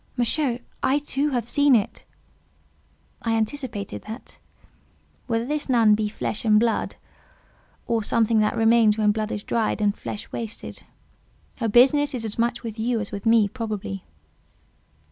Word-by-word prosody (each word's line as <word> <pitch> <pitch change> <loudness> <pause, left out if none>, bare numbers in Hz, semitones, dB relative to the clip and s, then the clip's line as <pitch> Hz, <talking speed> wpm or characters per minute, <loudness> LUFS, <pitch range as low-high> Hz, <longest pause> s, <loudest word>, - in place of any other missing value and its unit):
"Monsieur, 245 +1 +1 0.2
I, 270 - +2
too, 290 0 -1
have 245 -4 -2
seen 285 0 +4
it." 210 -4 -1 1.2
"I 225 -1 0
anticipated 225 -2 -3
that. 220 +4 -9 0.9
Whether 230 -1 0
this 295 +1 -3
nun 230 -4 +5
be 210 0 0
flesh 210 0 -3
and 215 -2 +5
blood, 230 0 0 0.9
or 230 -1 0
something 225 +1 +2
that 210 0 +1
remains 225 -1 +4
when 210 -1 +3
blood 215 0 -3
is 205 - -4
dried, 225 -2 -1
and 205 -1 +1
flesh 205 - -6
is - - -20
wasted, 225 -1 -6 0.8
her 230 -3 -1
business 275 +5 +4
is 230 -2 -2
as 220 +1 -4
much 235 +2 0
with 225 -1 -6
you 235 +1 0
as 210 - -5
with 200 +2 -4
me, 225 -2 +5
probably. 210 -4 -5
225 Hz, 155 wpm, -24 LUFS, 215-245 Hz, 1.2 s, nun